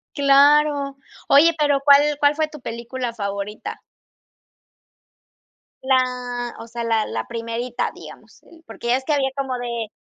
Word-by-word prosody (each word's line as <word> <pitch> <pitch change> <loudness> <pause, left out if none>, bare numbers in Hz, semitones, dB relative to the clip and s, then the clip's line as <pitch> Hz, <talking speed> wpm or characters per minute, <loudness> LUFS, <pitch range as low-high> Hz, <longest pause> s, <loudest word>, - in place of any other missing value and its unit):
Claro. 285 0 +4 0.3
Oye, 320 +4 +6
pero, 290 -2 +2
¿cuál 280 0 +7 0.2
cuál 290 0 +3
fue 310 0 0
tu 305 0 -12
película 235 +1 -5
favorita? 200 -1 -5 2.0
La, 250 -2 -1
o 225 - -9
sea, 235 0 -6
la 225 -2 +1
la - - -5
1, 235 +1 -3
digamos. - - -14 0.2
Porque 235 +3 -2
es 265 - -3
que 305 - 0
había 275 -2 +1
como 270 -2 -3
de 235 -2 -4
255 Hz, 130 wpm, -21 LUFS, 235-280 Hz, 2.0 s, cuál